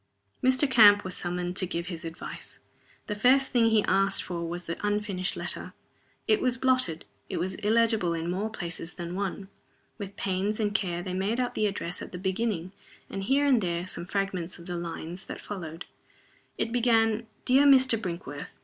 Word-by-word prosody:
Mr. 260 +3 +4
Camp 205 -5 +7
was 185 -1 -4
summoned 175 0 -3
to 185 - +1
give 170 -1 -3
his 170 -2 -6
advice. 165 0 -7 0.5
The - - -3
first 260 +6 +4
thing 235 -3 +4
he 220 -2 +4
asked 195 0 +2
for 170 -2 -4
was 175 +1 -5
the 170 - -4
unfinished 205 -3 -1
letter. - - -3 0.5
It 430 -2 +3
was 255 -1 +1
blotted, 255 -11 +2 0.2
it - - -3
was 185 +3 -1
illegible 215 -4 +2
in 165 0 -3
more 200 +4 -1
places 175 -4 -6
than 175 -1 -5
one. 195 0 -3 0.5
With 200 -1 -6
pains 200 +3 -1
and 205 -2 0
care 175 -5 -1
they 185 - -4
made 200 +6 0
out 250 -1 0
the 215 - +1
address 180 -3 -4
at - - -7
the 180 - -6
beginning, 190 -1 -1 0.4
and 195 - -3
here 275 +4 +3
and 260 -5 +4
there 175 -1 -1
some 180 -1 -5
fragments 190 -3 -2
of 170 - -12
the 175 - -4
lines 170 +2 -6
that - - -7
followed. 170 -4 -7 0.7
It 230 - -1
began: 225 -2 +2 0.2
"Dear 270 +3 +5
Mr. 260 -3 +6
Brinkworth." 170 -6 -6
195 Hz, 185 wpm, -28 LUFS, 175-225 Hz, 0.7 s, Camp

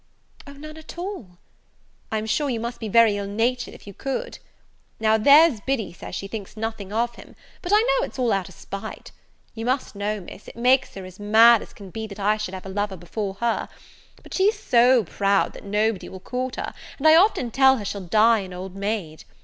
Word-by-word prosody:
"O, 280 - -10
none 305 +2 -10
at 315 +2 -11
all!" 345 - -6 0.7
"I'm 220 0 -1
sure 280 +6 0
you 235 -3 -1
must 235 +2 -5
be 225 - -4
very 225 -1 +5
ill 200 -1 -4
natured 235 +4 -1
if - - -15
you 200 - -10
could. 275 - -4 0.6
Now 220 0 +3
there's 280 +2 +6
Biddy 240 -6 -2
says 180 - -8
she 195 - -5
thinks 210 0 -8
nothing 215 -3 -5
of 235 +2 0
him, - - -14 0.3
but 355 - -4
I 420 - +6
know - - +1
it's - - -13
all 245 -3 +1
out 195 -1 -2
of 185 - -15
spite. 200 - -8 0.4
You 225 0 -6
must 255 +2 -1
know, 205 +1 -2
Miss, 185 +2 -12
it - - -11
makes 255 +3 +2
her 190 -1 -7
as 185 +1 -12
mad 225 +2 +6
as - - -11
can 195 -3 -12
be 220 +2 -5
that 205 0 -10
I 210 +2 +2
should 210 -3 -5
have 185 - -9
a - - -6
lover 200 0 -2
before 190 +3 -5
her; 235 -1 0 0.5
but - - -12
she's 410 +3 +2
so 245 - +4
proud 200 +2 +1
that - - -12
nobody 210 0 0
will 190 - -9
court 255 +6 -4
her, - - -5 0.2
and 300 - +2
I 315 - +8
often 335 - +3
tell 265 +1 +5
her 210 - -6
she'll 200 0 -4
die 220 +5 +4
an 190 -2 -7
old 185 +1 -7
maid. 195 -6 -4
220 Hz, 220 wpm, -23 LUFS, 200-255 Hz, 0.7 s, I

